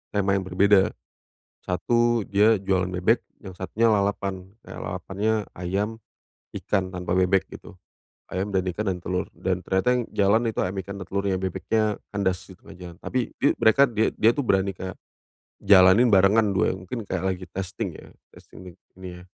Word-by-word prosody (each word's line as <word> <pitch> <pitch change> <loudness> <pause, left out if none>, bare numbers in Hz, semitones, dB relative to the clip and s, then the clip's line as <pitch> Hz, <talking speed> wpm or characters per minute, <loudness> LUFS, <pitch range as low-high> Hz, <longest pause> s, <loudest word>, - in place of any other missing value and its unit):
tema 100 -1 +1
yang 95 -1 0
berbeda. 95 +1 +3 0.7
Satu 120 +6 +1
dia 105 +1 +4
jualan 95 -1 0
bebek, 95 +6 +1 0.2
yang 95 -4 -10
satunya 110 +5 +1
lalapan. 100 -2 -1
Nah - - -9
lalapannya 100 +4 -2
ayam, 100 +5 -2 0.6
ikan, 95 -2 -1
tanpa 90 0 -3
bebek 95 +1 +2
gitu. 90 - -13 0.5
Ayam 95 +2 -3
dan 95 - +2
ikan 105 +4 -4
dan 90 - -5
telur. 90 0 -2
Dan 95 -1 -3
ternyata 110 +7 +1
yang 125 - 0
jalan 105 +4 +2
itu - - -5
ayam, 90 +2 -3
ikan 100 +2 -8
dan 95 - -8
telurnya 100 0 -1
bebeknya 105 +3 -1 0.2
kandas 95 -3 -1
di 95 - -12
tengah 95 - -14
jalan. 90 -1 -10
Tapi 130 - -2 0.2
di - - +3
mereka 110 +5 +4
dia 110 -2 0
dia 115 +2 +4
tuh 145 - -1
berani, 95 -3 +1
Kak, 95 0 -7 0.7
jalanin 100 +4 +6
barengan 100 +2 +4
duanya, 95 0 +1
mungkin 115 +6 -5
kayak 95 0 -3
lagi 90 0 -7
testing 95 +2 -5
ya, - - -14 0.2
testing 90 -2 -14
ini 95 0 -13
ya. 90 - -13
95 Hz, 170 wpm, -24 LUFS, 95-105 Hz, 0.7 s, jalanin